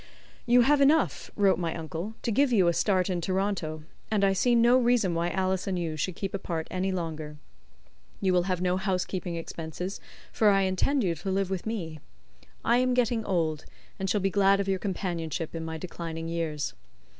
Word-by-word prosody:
"You 245 +1 +6
have 285 +3 +4
enough," 300 +3 +3
wrote 195 -3 +3
my 165 -2 -2
uncle, 165 +6 -5
"to 235 - 0
give 270 +4 +3
you 195 -7 +4
a 170 - +3
start 185 0 +2
in 180 -3 -1
Toronto, 185 -4 -2 0.3
and 210 -2 +1
I 195 -1 +4
see 240 +5 +3
no 240 +2 +5
reason 240 -7 +2
why 170 +1 0
Alice 190 +1 -1
and 190 -2 -1
you 165 -3 -2
should 165 +3 -2
keep 195 +1 -4
apart 170 -5 -3
any 185 +1 -1
longer. 160 -4 -4 0.8
You 190 -2 +1
will 180 0 +2
have 180 -1 0
no 180 0 +1
housekeeping 185 -2 -2
expenses, 165 +3 -5 0.3
for 215 - +4
I 195 -1 +4
intend 190 +9 +1
you 175 -3 +1
to 175 +4 -5
live 190 0 0
with 190 +2 -3
me. 165 -9 -4 0.7
I 235 - +4
am 255 0 +2
getting 240 -2 +1
old, 160 -5 -1 0.3
and 190 0 -2
shall 205 +1 +1
be 195 +1 +1
glad 195 0 +4
of 200 - -1
your 190 -1 0
companionship 170 -5 -3
in 165 -1 -4
my 160 0 -4
declining 165 -1 -6
years. 165 -3 -2
185 Hz, 195 wpm, -28 LUFS, 170-205 Hz, 0.8 s, You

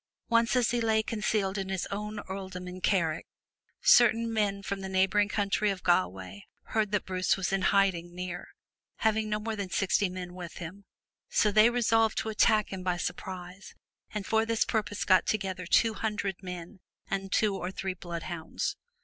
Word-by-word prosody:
Once 230 +1 +3
as 245 -3 +3
he 240 -1 0
lay 220 -1 +2
concealed 210 -3 -1
in 190 -1 -4
his 190 -2 -2
own 210 +1 -4
earldom 190 -2 -6
of 180 +1 -8
Carrick, 170 -6 +1 0.6
certain 230 -1 +5
men 200 -2 0
from 200 0 -3
the 190 - -5
neighboring 190 +2 +2
county 205 0 +1
of 195 -2 -3
Galloway 95 - 0 0.2
heard 215 -2 -1
that 210 -2 0
Bruce 185 0 +1
was 190 0 -1
in 195 - +1
hiding 180 -4 +2
near, 180 -1 -5 0.5
having 220 0 +1
no 210 0 0
more 220 +1 -3
than 200 -3 -4
sixty 195 +1 +1
men 180 -1 -6
with 175 -2 -8
him. 185 +4 -8 0.4
So 210 - +3
they 215 +3 +6
resolved 225 -2 +2
to 220 - -1
attack 215 -1 +3
him 190 - -4
by 180 -1 0
surprise, 180 +2 -6 0.3
and 210 -2 -4
for 220 0 +2
this 225 0 +1
purpose 210 -2 -1
got 185 -2 +4
together 190 -4 -2
two 225 +4 +4
hundred 210 -4 -3
men 180 +1 -8 0.3
and 195 0 -3
two 210 -2 +2
or 180 -1 -3
three 190 0 -3
bloodhounds. 170 -2 -4
195 Hz, 175 wpm, -29 LUFS, 185-215 Hz, 0.6 s, they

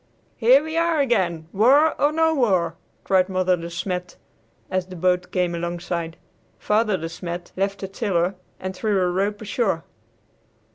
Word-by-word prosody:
"Here 255 +5 +5
we 315 +1 -4
are 335 -1 +2
again, 180 - +1
war 275 +10 +5
or 290 - +4
no 320 +1 +2
war!" 190 - +2 0.3
cried 185 -1 +2
Mother 185 -1 +2
De 170 -1 -7
Smet, 180 +1 -4 0.6
as 185 -1 -1
the 185 - -9
boat 180 +1 0
came 180 -1 0
alongside. 170 -1 -4 0.4
Father 210 -1 +1
De 165 - -4
Smet 175 +1 -6
left 195 +1 -1
the 195 - -3
tiller 190 -3 0 0.3
and 185 0 -5
threw 205 0 0
a 180 -1 +1
rope 205 +3 -1
ashore. 200 -5 -1
185 Hz, 155 wpm, -23 LUFS, 175-225 Hz, 0.6 s, Here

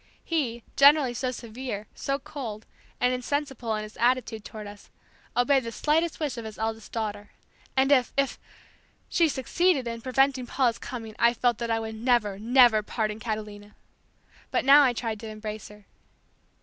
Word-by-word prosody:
He, 245 -8 -1
generally 280 -2 +6
so 255 +2 -2
severe, 235 -3 -6
so 275 0 -2
cold, 225 -8 -7 0.3
and 250 0 +2
insensible 250 -3 -2
in 215 - -3
his 215 0 -11
attitude 240 -2 +1
toward 215 0 -8
us, 205 0 -12 0.5
obeyed 265 +2 +3
the 230 - -5
slightest 315 +6 0
wish 290 -6 -2
of 235 - -5
his 215 -1 -8
eldest 220 0 -4
daughter. 210 -2 -4 0.5
And 270 +1 +4
if 255 -4 +4
if! 275 -1 0 0.7
she 335 -2 +3
succeeded 275 +1 +1
in 230 0 -5
preventing 260 0 +1
Paula's 240 -3 +1
coming 225 -4 -7
I 235 +1 +4
felt 240 -1 +1
that 235 -1 -3
I 225 0 +1
would 220 0 -5
never, 220 -3 +1
never 240 -1 +5
pardon 215 0 -3
Catalina! 210 -2 -6 0.7
But - - 0
now 280 +2 +9
I 260 -4 +4
tried 225 -2 -3
to 225 - -8
embrace 215 0 -6
her. 210 -1 -16
235 Hz, 165 wpm, -27 LUFS, 220-265 Hz, 0.7 s, now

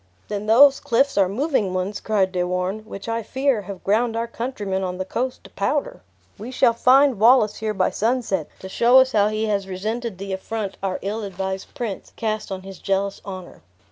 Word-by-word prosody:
"Then 210 0 -4
those 270 +5 +7
cliffs 270 +4 +1
are 195 -2 +3
moving 215 - 0
ones," 190 +3 -2
cried 200 -4 +1
De 180 -1 -1
Warenne, 180 +3 -1
"which, 200 -1 -8
I 230 0 -1
fear, 265 0 0
have 195 -1 -9
ground 225 +3 +1
our 230 0 -1
countrymen 230 -5 -3
on 180 -1 -3
the 185 - -3
coast 250 +6 -3
to - - -15
powder! 280 +8 -2 0.4
We 220 +4 -7
shall 255 -2 +3
find 255 0 +4
Wallace 225 -1 +5
here 215 -1 -3
by 185 - +1
sunset, 220 - 0
to 190 - -7
show 235 +6 +4
us 260 0 +6
how 205 -3 +3
he 215 +1 -1
has 200 -2 -1
resented 215 +3 -4
the 195 0 -5
affront 200 +1 -4
our 190 -1 -1
ill 210 +3 -3
advised 190 -1 -5
prince 220 -6 -5
cast 215 -2 -3
on 190 -1 -5
his 195 -1 -10
jealous 195 0 -1
honor." 185 -3 -9
210 Hz, 200 wpm, -22 LUFS, 190-235 Hz, 0.4 s, those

